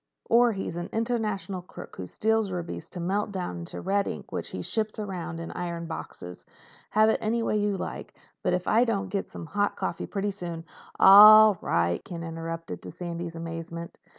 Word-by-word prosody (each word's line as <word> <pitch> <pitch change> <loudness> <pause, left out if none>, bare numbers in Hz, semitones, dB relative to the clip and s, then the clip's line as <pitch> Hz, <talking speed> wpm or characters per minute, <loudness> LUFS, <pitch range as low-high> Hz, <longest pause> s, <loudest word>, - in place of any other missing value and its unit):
Or 240 +1 +6
he's 190 -4 -4
an 175 - -4
international 215 -5 -2
crook 180 - -11
who 90 - -6
steals 220 - 0
rubies 175 -2 -5
to 180 - -8
melt 200 +4 -1
down 180 - -4
into 85 - -6
red 200 +1 +1
ink - - -6
which - - -4
he - - -5
ships 220 -1 -1
around 185 -5 -5
in 165 - -6
iron 170 -1 -4
boxes. 90 - -8 0.5
Have 215 +1 +4
it - - +2
any 230 +2 0
way 215 - +1
you 205 -1 0
like. - - -6 0.3
But - - 0
if 180 0 -4
I 230 +2 +4
don't 225 -5 -1
get 200 - -2
some - - -8
hot 205 +4 0
coffee - - -3
pretty 205 0 -2
soon—" 170 -4 -6 0.3
"All 210 0 +9
right," 85 0 0
Ken 170 -4 -7
interrupted, 165 - -6
to 90 - -9
Sandy's 170 - -6
amazement. 165 0 -6
185 Hz, 185 wpm, -27 LUFS, 165-210 Hz, 0.5 s, All